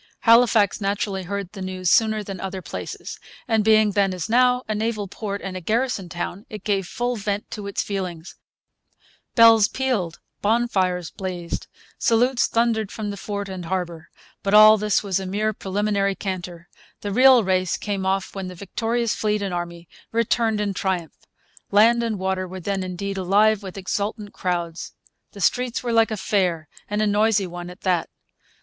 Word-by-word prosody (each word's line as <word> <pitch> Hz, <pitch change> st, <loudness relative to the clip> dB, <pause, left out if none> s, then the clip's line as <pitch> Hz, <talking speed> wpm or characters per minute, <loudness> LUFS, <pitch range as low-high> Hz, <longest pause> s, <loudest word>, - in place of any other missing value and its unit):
Halifax 230 Hz, -3 st, +4 dB
naturally 200 Hz, -1 st, -1 dB
heard 200 Hz, -1 st, -4 dB
the 195 Hz, -, -9 dB
news 185 Hz, -1 st, -1 dB
sooner 220 Hz, -1 st, +3 dB
than 195 Hz, -2 st, -7 dB
other 190 Hz, -1 st, -5 dB
places; -, -, -7 dB, 0.3 s
and 225 Hz, -3 st, +2 dB
being 215 Hz, -1 st, +5 dB
then, 195 Hz, -2 st, +1 dB
as 175 Hz, -3 st, -4 dB
now, 250 Hz, +2 st, +3 dB
a 215 Hz, -, -1 dB
naval 215 Hz, -1 st, -2 dB
port 200 Hz, 0 st, -5 dB
and 190 Hz, -1 st, -5 dB
a 185 Hz, -, -5 dB
garrison 220 Hz, -2 st, -1 dB
town, 175 Hz, +3 st, -5 dB
it 210 Hz, -2 st, -8 dB
gave 195 Hz, -3 st, 0 dB
full 245 Hz, +2 st, -2 dB
vent 205 Hz, 0 st, -3 dB
to 205 Hz, -1 st, -6 dB
its 200 Hz, -, -2 dB
feelings. 185 Hz, -4 st, -5 dB, 1.0 s
Bells 225 Hz, -3 st, +7 dB
pealed. 225 Hz, -11 st, -2 dB, 0.2 s
Bonfires 195 Hz, -6 st, +1 dB
blazed. 180 Hz, -3 st, -5 dB, 0.3 s
Salutes 245 Hz, +2 st, +3 dB
thundered 230 Hz, -3 st, +1 dB
from 210 Hz, -2 st, -4 dB
the -, -, -5 dB
fort 200 Hz, 0 st, -5 dB
and 185 Hz, -2 st, -6 dB
harbour. 170 Hz, -2 st, -4 dB, 0.3 s
But 200 Hz, +1 st, +1 dB
all 215 Hz, 0 st, +9 dB
this 210 Hz, -1 st, +1 dB
was 195 Hz, -2 st, 0 dB
a 190 Hz, -, -5 dB
mere 215 Hz, +3 st, 0 dB
preliminary 200 Hz, 0 st, -1 dB
canter. 175 Hz, -3 st, -5 dB, 0.3 s
The 205 Hz, -, -3 dB
real 255 Hz, +2 st, +6 dB
race 185 Hz, -2 st, +1 dB
came 200 Hz, -2 st, -3 dB
off 190 Hz, 0 st, -1 dB
when 195 Hz, -2 st, -5 dB
the 180 Hz, -, -8 dB
victorious 225 Hz, +5 st, -1 dB
fleet 210 Hz, -1 st, -1 dB
and 195 Hz, -2 st, -3 dB
army 170 Hz, -1 st, -5 dB, 0.2 s
returned 230 Hz, -1 st, +1 dB
in 205 Hz, -1 st, -1 dB
triumph. 180 Hz, -5 st, -2 dB, 0.6 s
Land 230 Hz, +4 st, +5 dB
and 230 Hz, -3 st, -1 dB
water 190 Hz, 0 st, -2 dB
were 185 Hz, +1 st, -7 dB
then 195 Hz, +2 st, -2 dB
indeed 190 Hz, +2 st, -4 dB
alive 205 Hz, +3 st, +3 dB
with 190 Hz, -1 st, -8 dB
exultant 205 Hz, +2 st, -3 dB
crowds. 170 Hz, -2 st, -3 dB, 0.4 s
The 200 Hz, -, -9 dB
streets 250 Hz, +6 st, +1 dB
were 240 Hz, -1 st, -1 dB
like 225 Hz, 0 st, +4 dB
a 220 Hz, -, -3 dB
fair, 180 Hz, -5 st, 0 dB, 0.2 s
and 210 Hz, +1 st, 0 dB
a -, -, +3 dB
noisy 210 Hz, 0 st, +2 dB
one 175 Hz, 0 st, -7 dB
at 180 Hz, +2 st, -12 dB
that. 180 Hz, -3 st, 0 dB
200 Hz, 175 wpm, -23 LUFS, 185-220 Hz, 1.0 s, all